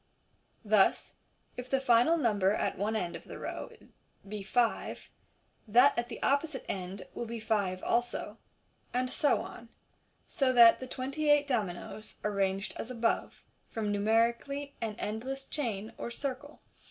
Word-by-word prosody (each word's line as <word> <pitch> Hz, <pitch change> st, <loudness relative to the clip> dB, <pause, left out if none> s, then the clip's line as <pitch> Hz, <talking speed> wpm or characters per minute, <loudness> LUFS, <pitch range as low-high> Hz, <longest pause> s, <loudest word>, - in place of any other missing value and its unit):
Thus 210 Hz, -2 st, +3 dB, 0.4 s
if 250 Hz, 0 st, -6 dB
the 270 Hz, -, +2 dB
final 245 Hz, +5 st, +4 dB
number 205 Hz, -, +2 dB
at -, -, -1 dB
one 210 Hz, +3 st, -1 dB
end 180 Hz, -5 st, -2 dB
of -, -, -9 dB
the -, -, -8 dB
row -, -, -5 dB, 0.6 s
be 210 Hz, 0 st, -5 dB
five, 230 Hz, +4 st, -1 dB, 0.6 s
that 245 Hz, +6 st, +6 dB
at 235 Hz, 0 st, -2 dB
the 230 Hz, -, -7 dB
opposite 280 Hz, 0 st, +1 dB
end 185 Hz, 0 st, -4 dB
will 235 Hz, -, -4 dB
be 230 Hz, 0 st, -5 dB
five 200 Hz, -4 st, -1 dB
also, 240 Hz, +1 st, -1 dB, 0.6 s
and 255 Hz, 0 st, 0 dB
so 290 Hz, -, +2 dB
on 230 Hz, -, -10 dB
j -, -, -33 dB, 0.5 s
so 265 Hz, -2 st, +1 dB
that 235 Hz, -2 st, +8 dB
the 260 Hz, -, -6 dB
twenty 275 Hz, +4 st, -2 dB
eight 295 Hz, 0 st, +5 dB
dominoes, 215 Hz, -3 st, -3 dB
arranged 195 Hz, -1 st, 0 dB
as 225 Hz, -, -5 dB
above, 235 Hz, -2 st, -1 dB, 0.3 s
form 215 Hz, -2 st, -2 dB
numerically 235 Hz, +7 st, +1 dB
an 220 Hz, -2 st, -2 dB
endless 260 Hz, +6 st, -4 dB
chain, 225 Hz, -9 st, -3 dB
or -, -, -4 dB
circle. 275 Hz, +4 st, -5 dB
235 Hz, 150 wpm, -31 LUFS, 210-265 Hz, 0.6 s, that